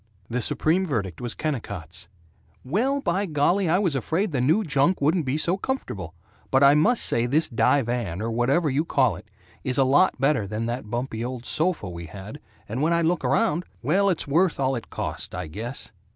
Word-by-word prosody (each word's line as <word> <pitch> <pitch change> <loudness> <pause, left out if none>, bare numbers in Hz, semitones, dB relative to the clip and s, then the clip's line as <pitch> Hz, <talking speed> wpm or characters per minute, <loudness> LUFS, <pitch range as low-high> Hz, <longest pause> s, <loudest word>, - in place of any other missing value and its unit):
The 125 +1 0
supreme 165 - +1
verdict 110 - -3
was 120 -1 -3
Kennicott's 95 - -5 0.6
"Well, 250 - 0
by 195 -1 0
golly, 170 +4 +2
I 175 - +4
was 185 -6 +1
afraid 165 - -1
the 135 -4 0
new 160 - +3
junk 150 +2 +2
wouldn't 155 +1 +1
be 130 +4 0
so 170 +4 +1
comfortable, 100 - -4 0.3
but 135 +1 +3
I 140 +1 +8
must 215 +12 +3
say 115 +1 +1
this 150 +6 +2
divan, 120 -7 0
or 115 +2 -2
whatever 130 +8 +1
you 145 +2 +1
call 130 - +2
it, 90 - -13 0.4
is 130 +1 0
a 135 - +5
lot 140 +5 +3
better 135 -6 +2
than 110 +3 -3
that 120 -1 -4
bumpy 120 -1 -3
old 125 -1 -5
sofa 165 - 0
we 85 -1 -7
had, 100 - -9 0.3
and 115 +6 -3
when 165 +3 +2
I 170 0 +2
look 165 -1 +1
around 150 +6 +1 0.2
Well, 195 +9 +3
it's 175 - -1
worth 165 +4 +2
all 135 0 +1
it 115 - -7
cost, - - -4
I - - -4
guess." 110 - -6
135 Hz, 195 wpm, -25 LUFS, 115-165 Hz, 0.6 s, I